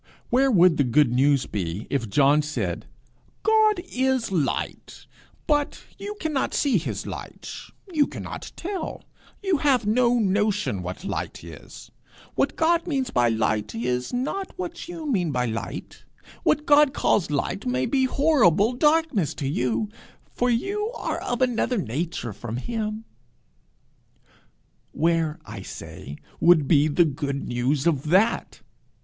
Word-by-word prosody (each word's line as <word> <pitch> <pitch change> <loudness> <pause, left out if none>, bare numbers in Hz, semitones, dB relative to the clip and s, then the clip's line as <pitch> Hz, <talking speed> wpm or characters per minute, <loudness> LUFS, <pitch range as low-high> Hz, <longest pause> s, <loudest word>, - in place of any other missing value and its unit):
Where 265 +3 +4
would 180 - +5
the 145 - +4
good 135 +1 +3
news 135 +1 +3
be 95 0 -4
if 120 -6 -1
John 140 +7 +4
said, 150 +1 -3 0.6
'God 435 -3 +4
is 260 -3 +1
light, 155 -8 -2 0.4
but 295 -2 0 0.2
you 415 +1 -5
cannot 305 -4 -1
see 265 -9 +2
his 160 - -4
light; - - -7 0.4
you 295 -3 +3
cannot - - -7
tell, 375 0 -5 0.4
you 385 -4 +2
have 270 -5 +2
no 240 +3 +3
notion, 205 - +1
what 90 - -6
light 195 - -4
is; - - -12 0.4
what - - 0
God 335 +2 +2
means 270 -6 -1
by 120 -1 +3
light, 110 -1 0
is 125 +2 -2
not 290 +12 -3
what 345 -2 -6
you 335 -3 -6
mean 190 - 0
by 125 -2 0
light; 115 -1 -5 0.4
what 300 - +1
God 290 -1 +5
calls 185 - +2
light 150 +5 -2
may 125 +1 +1
be 265 -2 +2
horrible 250 - +3
darkness 295 - +2
to 140 - -3
you, 125 - 0 0.5
for 245 - +1
you 400 - -1
are - - -3
of 245 +1 -1
another 245 0 +1
nature 150 - -3
from 115 +2 -6
him!' 220 - -4 1.9
Where, 165 -1 +1
I - - -8
say, 70 - -9 0.2
would 165 -5 +5
be 150 -1 +4
the 160 +3 +3
good 140 -2 -3
news 130 +4 0
of 150 -3 +1
that? 190 +6 +2
195 Hz, 140 wpm, -24 LUFS, -, 1.9 s, would